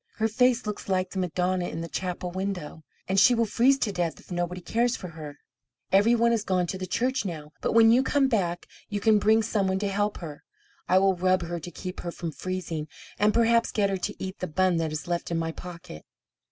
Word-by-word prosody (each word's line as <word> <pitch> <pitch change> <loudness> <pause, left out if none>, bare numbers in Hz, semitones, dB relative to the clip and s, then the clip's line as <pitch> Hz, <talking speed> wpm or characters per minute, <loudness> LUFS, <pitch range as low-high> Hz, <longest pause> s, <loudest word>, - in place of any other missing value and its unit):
Her 220 - +1
face 250 +2 +2
looks 210 -1 -5
like 185 -1 0
the 190 - -3
Madonna 180 0 0
in 165 - -5
the 165 - -4
chapel 180 0 -4
window, 185 -4 -4 0.3
and 190 +1 +2
she 245 +5 +6
will 230 0 +2
freeze 250 +6 +3
to 225 -6 -1
death 175 -3 -2
if - - -18
nobody 175 +1 -2
cares 235 +7 0
for 180 - -7
her. 155 -3 -9 0.5
Every 205 +5 +5
one 235 0 +3
has 230 -3 +1
gone 185 -3 +1
to 190 - -4
the 185 - -4
church 255 +7 0
now, 155 -6 -6
but - - 0
when 225 0 +7
you 245 +3 +5
come 275 +1 +2
back 180 -8 -1 0.2
you 205 -1 -2
can 215 0 +4
bring 220 +2 +4
some 205 -3 0
one 190 0 +1
to 205 +1 -1
help 205 +1 -1
her. 155 -4 -9 0.4
I 185 - +4
will 190 0 +4
rub 185 0 +2
her 170 0 -4
to 165 - -8
keep 180 +1 -7
her 175 - -4
from 170 -1 -5
freezing, 170 -3 -4 0.3
and 210 +1 +4
perhaps 230 +1 +3
get 200 -2 +1
her 195 - 0
to 205 +3 -4
eat 190 0 -6
the 185 - -3
bun 185 +2 +2
that 160 -1 -1
is 155 0 -5
left 175 -1 -2
in 170 - -1
my 165 0 -1
pocket." 170 - -10
185 Hz, 235 wpm, -26 LUFS, 175-215 Hz, 0.5 s, when